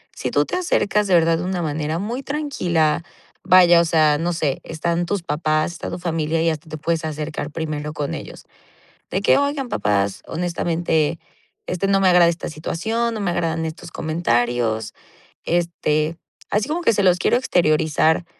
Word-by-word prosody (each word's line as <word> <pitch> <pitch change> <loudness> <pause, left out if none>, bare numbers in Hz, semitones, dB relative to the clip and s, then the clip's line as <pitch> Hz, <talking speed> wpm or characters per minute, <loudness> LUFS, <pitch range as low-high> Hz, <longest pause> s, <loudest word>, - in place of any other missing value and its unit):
si - - -3
tú - - +2
te - - -4
acercas 210 - +1
de 185 - +4
verdad 165 -1 +3
de - - -3
una 180 -1 -2
manera 155 +1 -2
muy 235 +7 -4
tranquila. 175 - 0 0.4
Vaya, 175 -2 +7
o - - +1
sea, 155 -2 +3
no 170 +2 0
sé. 155 -5 -1
Están 170 +2 -2
tus 190 0 -2
papás, 155 +1 0
está 170 - -6
tu - - -4
familia 165 -2 -1
y 165 - +3
hasta 155 0 -5
te 155 - -6
puedes 165 +2 -1
acercar 150 -1 -4
primero 150 -1 -4
con 150 -2 -3
ellos. - - -8 0.7
De 190 - -1
que: - - +4
"Oigan, 280 -2 -1
papás, 100 - 0
honestamente, 165 -2 -1 0.5
este, 180 +2 -1
no 195 0 +3
me 190 - +4
agrada 175 -1 +6
esta 170 +1 -3
situación, 220 +9 -2
no 220 - -4
me 200 -3 0
agradan 165 -1 -1
estos 170 +2 -8
comentarios", 120 -9 0 0.5
este, 165 -2 0 0.3
así 210 +3 0
como 330 +3 -1
que 280 - +3
se 200 - +1
los 180 -1 +4
quiero - - +2
exteriorizar. 160 - +2
165 Hz, 175 wpm, -21 LUFS, 155-180 Hz, 0.7 s, Vaya